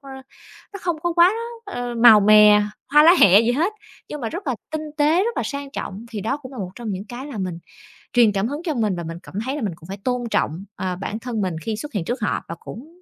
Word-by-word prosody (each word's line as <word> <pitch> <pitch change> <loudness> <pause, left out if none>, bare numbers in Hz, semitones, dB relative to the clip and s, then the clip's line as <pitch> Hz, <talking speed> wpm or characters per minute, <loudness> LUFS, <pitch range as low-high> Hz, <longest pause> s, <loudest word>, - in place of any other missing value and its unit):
ờ, 275 -2 -12 0.6
nó 400 - -7
không 345 -3 -1
có 345 -1 0
quá, 345 +3 +5 0.3
ờ, 245 -11 -5
màu 230 -2 +8
mè, 210 0 +7 0.3
hoa 300 0 +8
lá 340 +3 +8
hẹ 200 +2 +8
gì 235 +1 +1
hết, 340 +10 0 0.4
nhưng 300 - -6
mà 230 - -2
rất 345 - -7
là 260 - 0 0.2
tinh 310 0 -2
tế, 315 +6 +3
rất 470 - -2
là - - 0
sang 280 -1 -5
trọng 205 -4 -6
thì 210 -3 -5
đó 230 +8 -1
cũng 275 -2 -12
là 255 - -9
một 185 -2 -4
trong 235 -3 -6
những 190 +2 -5
cái 245 +5 -8
là 255 -8 -7
mình 180 -3 -3 0.6
truyền 235 -4 +5
cảm 200 +2 -1
hứng 290 +4 -5
cho 320 -4 -1
mình 215 -6 0
và 170 - -5
mình 165 +1 -6
cảm - - -13
thấy 270 +2 -2
là 295 - -4
mình 200 -6 -2
cũng 165 0 -16
phải 195 +1 -6
tôn 250 -1 -1
trọng, 165 +6 -1
ờ, 185 -1 -3
bản 205 +4 -5
thân 230 -3 -4
mình 185 -4 -2
khi 220 - -2
xuất 250 +5 -8
hiện 180 -5 -2
trước 240 -1 -3
họ 210 - -1
và 170 - -6
cũng 320 - -11
235 Hz, 270 wpm, -22 LUFS, 200-295 Hz, 0.6 s, màu